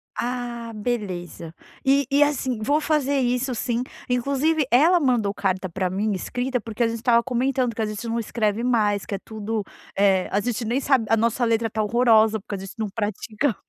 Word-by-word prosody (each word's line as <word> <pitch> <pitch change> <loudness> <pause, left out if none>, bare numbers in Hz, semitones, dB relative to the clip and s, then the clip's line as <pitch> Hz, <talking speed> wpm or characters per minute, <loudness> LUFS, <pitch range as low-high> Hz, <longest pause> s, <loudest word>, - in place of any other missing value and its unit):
Ah, 240 -1 -4
beleza. 185 -8 -4 0.3
E 275 +1 +4
e, 285 +1 +6
assim, 260 -5 -1
vou 290 +8 +2
fazer 290 -2 +1
isso 250 +1 0
sim, 240 +1 -1 0.3
inclusive 280 +5 +1
ela 320 +9 +5
mandou 240 -9 +1
carta 190 -2 -1
pra 185 +1 -2
mim 205 +4 -1
escrita, 250 +6 -2
porque 225 +2 -6
a 230 - +3
gente 230 - -3
estava 235 +1 +3
comentando 255 -1 0
que 225 - -2
a - - +1
gente 215 +2 -5
não 230 +1 -1
escreve 220 -1 -1
mais, 210 -5 +1
que 200 - -3
é - - -5
tudo 220 0 -4 0.3
eh, 195 -2 +3
a 200 - +2
gente 235 +1 -2
nem 240 +5 0
sabe 265 -5 +2
a 225 - +4
nossa 230 +2 +1
letra 225 0 +1
está 220 0 -2
horrorosa, 220 -1 +4
porque 205 +1 -6
a - - -4
gente 195 0 -8
não 220 -2 -2
pratica 215 +4 -2
230 Hz, 195 wpm, -23 LUFS, 210-250 Hz, 0.3 s, e